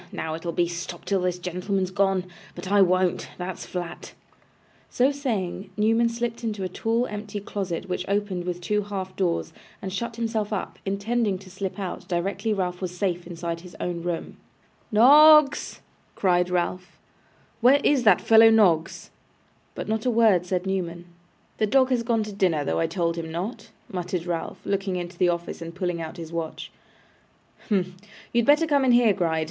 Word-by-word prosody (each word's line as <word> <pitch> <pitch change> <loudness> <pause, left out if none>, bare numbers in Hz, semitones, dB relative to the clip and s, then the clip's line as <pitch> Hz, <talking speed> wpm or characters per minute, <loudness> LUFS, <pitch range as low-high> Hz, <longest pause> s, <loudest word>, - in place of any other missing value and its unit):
Now 160 - -4
it'll 165 +1 -4
be 170 +1 +1
"Stop 175 0 -6
till 195 -2 +1
this 180 -1 0
gentleman's 180 +1 -2
gone." 195 -1 +1 0.3
But 190 - -6
I 205 -1 +5
won't. 185 -1 +2
That's 180 0 -6
flat.' 175 -2 -6 0.8
So 255 +3 +2
saying, 215 -10 -3
Newman 225 +2 +3
slipped 235 0 -4
into 210 -4 -3
a - - -1
tall 225 +6 0
empty 210 -2 -5
closet 190 -3 -4
which 180 0 -3
opened 200 -3 -1
with 180 0 -4
two 210 +4 0
half 190 -2 -5
doors, 175 -3 -1 0.3
and 190 -1 -6
shut 235 +3 -3
himself 225 -2 -2
up; 205 - -4
intending 200 +1 0
to 185 0 -14
slip 190 0 -5
out 190 -2 -5
directly 195 +4 -1
Ralph 180 -3 -2
was 180 -1 -4
safe 175 -3 -1
inside 170 -1 -5
his 180 0 -13
own 175 -1 -3
room. 170 -1 -4 0.5
'Noggs!' 295 +6 +6 0.3
cried 180 -2 +2
Ralph, 180 0 -2 0.6
'where 255 +4 +6
is 285 -3 +3
that 215 -6 +5
fellow, 225 0 +7
Noggs?' 180 -8 +2 0.6
But - - -5
not 220 +2 -1
a - - +4
word 220 -7 +3
said 180 0 -1
Newman. 175 -3 -3 0.5
'The 215 - +2
dog 260 +3 +4
has 245 -2 +2
gone 230 -1 0
to 210 - -7
his 200 - -11
dinner, 165 -6 +2
though 80 0 0
I - - +1
told 170 -3 -1
him 160 -1 -5
not,' 185 +9 -5 0.2
muttered 180 -2 -3
Ralph, 170 -2 -3
looking 195 -1 -1
into 175 0 -5
the 180 - +4
office, 170 0 -3
and 165 0 -7
pulling 175 -2 -2
out 160 +2 -7
his 165 -1 -8
watch. 165 -1 -5 1.0
'Humph!' 190 -4 +1 0.4
You 240 - +3
had 235 - +1
better 295 +3 +5
come 285 -3 +2
in 255 -2 +4
here, 240 -3 +5
Gride. 165 -3 0
190 Hz, 180 wpm, -25 LUFS, 175-220 Hz, 1.0 s, fellow